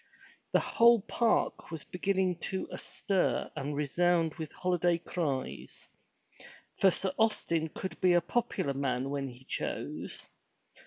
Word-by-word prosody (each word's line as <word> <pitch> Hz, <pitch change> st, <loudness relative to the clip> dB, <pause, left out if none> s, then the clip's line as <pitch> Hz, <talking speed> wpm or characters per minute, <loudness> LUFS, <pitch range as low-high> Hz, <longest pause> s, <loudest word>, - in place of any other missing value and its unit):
The -, -, +5 dB
whole 235 Hz, -1 st, +5 dB
park 235 Hz, -2 st, +1 dB
was 165 Hz, -4 st, -6 dB
begin 190 Hz, +2 st, -1 dB
ning 185 Hz, -2 st, +2 dB
to 190 Hz, +2 st, -3 dB
be -, -, -12 dB
astir 195 Hz, -3 st, -1 dB
and 145 Hz, +1 st, -3 dB
resound 165 Hz, +3 st, +2 dB
with 160 Hz, -3 st, -6 dB
holiday 175 Hz, -1 st, +1 dB
cries. 155 Hz, -6 st, -4 dB, 0.9 s
For 195 Hz, -, +7 dB
Sir 190 Hz, +1 st, -1 dB
Austin 170 Hz, -7 st, +1 dB
could 185 Hz, +2 st, -6 dB
be 180 Hz, -1 st, +5 dB
a 175 Hz, -, +6 dB
popular 190 Hz, -11 st, -1 dB
man 135 Hz, -1 st, -1 dB
when 140 Hz, -1 st, -2 dB
he 125 Hz, 0 st, -11 dB
chose. -, -, -4 dB
175 Hz, 140 wpm, -31 LUFS, 145-190 Hz, 0.9 s, For